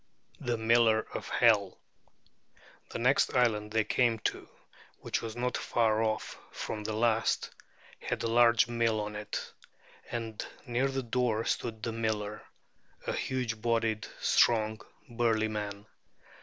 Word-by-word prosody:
THE 120 -1 -1
MILLER 110 0 +4
OF - - -5
HELL 105 -5 +3 1.1
The - - -5
next 125 +3 +2
island 110 -4 +2
they 110 0 +2
came 120 0 +2 0.2
to, - - -13 0.5
which - - -2
was 115 -1 -6
not 125 +1 -1
far 110 -2 +1
off 110 -1 -2
from 105 - -5
the 110 - -3
last, 115 0 +1 0.5
had - - -3
a - - +1
large 115 0 +5
mill 115 -2 +1
on 105 0 -4
it; 105 0 -5 0.6
and 115 -2 -4 0.2
near 125 +1 +1
the 135 -1 -2
door 115 -2 0
stood 110 -3 -2
the 115 - -1
miller, 110 -2 -2 0.6
a - - -1
huge 125 -4 -2
bodied, 115 -2 0
strong, 110 -2 +3 0.3
burly 115 -2 +1
man. 105 -1 -5
115 Hz, 135 wpm, -30 LUFS, 110-120 Hz, 1.1 s, large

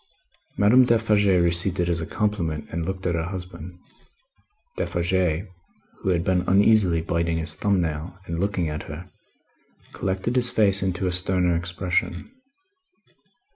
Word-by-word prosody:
Madame 110 +6 +6
Defarge 110 -4 +2
received 90 0 +2
it 85 - +1
as 85 -1 0
a 80 - -5
compliment, 100 -8 -2
and 85 0 -3
looked 95 0 -4
at 85 - +1
her 80 -1 -1
husband. 90 -2 -7 1.0
Defarge, 85 0 0 0.5
who - - -2
had 85 -2 +1
been 90 -1 +1
uneasily 95 -3 +4
biting 85 0 -1
his 80 -1 -2
thumb 100 +4 +1
nail 80 +2 -4
and 85 0 -4
looking 95 -3 0
at 75 0 -4
her, 85 +5 -9 0.8
collected 95 +6 -2
his 125 -1 +2
face 100 -2 +2
into 95 0 -1
a 90 - +1
sterner 90 -1 +1
expression. 90 - -2
90 Hz, 140 wpm, -24 LUFS, 85-95 Hz, 1.0 s, Madame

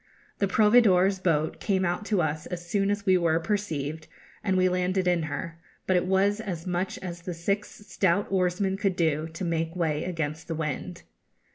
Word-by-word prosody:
The 200 - +2
proveedor's 200 -3 +4
boat 160 -4 0
came 190 -2 +1
out 175 +4 -1
to 205 -5 +1
us 155 0 -2
as 175 -1 -6
soon 200 +1 +1
as 205 0 -1
we 185 -2 +4
were 165 -1 +2
perceived, 160 -5 -3 0.4
and 190 -3 +1
we 185 0 +4
landed 180 +1 0
in 175 -2 +3
her; 165 +3 -5 0.3
but 185 - +2
it 180 0 +2
was 195 +2 +2
as 180 -7 -5
much 180 +1 -2
as 175 -2 -6
the 180 0 -5
six 200 +5 -1 0.2
stout 195 0 +1
oarsmen 190 +1 +1
could 195 -2 0
do 160 -3 +1
to 175 +3 -5
make 165 0 -1
way 160 -3 0
against 160 -3 -3
the 165 - -3
wind. 160 +3 -4
180 Hz, 185 wpm, -27 LUFS, 165-195 Hz, 0.4 s, proveedor's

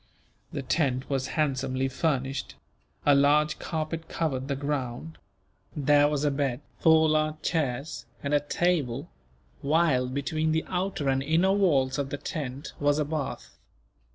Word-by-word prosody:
The 140 - -4
tent 130 -2 0
was 135 -1 0
handsomely 135 -3 0
furnished. 135 -1 -2 0.5
A 145 - +6
large 145 +2 +3
carpet 160 0 -4
covered 135 -5 -2
the 140 - -1
ground. 140 +1 -4 0.6
There 145 0 +4
was 150 -1 -1
a 145 - +3
bed, 135 -2 -1 0.2
four 160 -1 +5
large 155 0 +1
chairs, 145 -4 -2 0.2
and 140 +1 -1
a 145 - +5
table; 145 -4 -1 0.5
while 140 -4 +2
between 155 +4 -1
the 160 - 0
outer 185 -4 -2
and 135 0 +2
inner 165 +7 +3
walls 145 -9 +2
of 140 -1 -2
the 145 - -3
tent 140 -2 -5
was 145 0 +2
a 150 - +1
bath. 150 -2 -5
145 Hz, 145 wpm, -27 LUFS, 135-160 Hz, 0.6 s, A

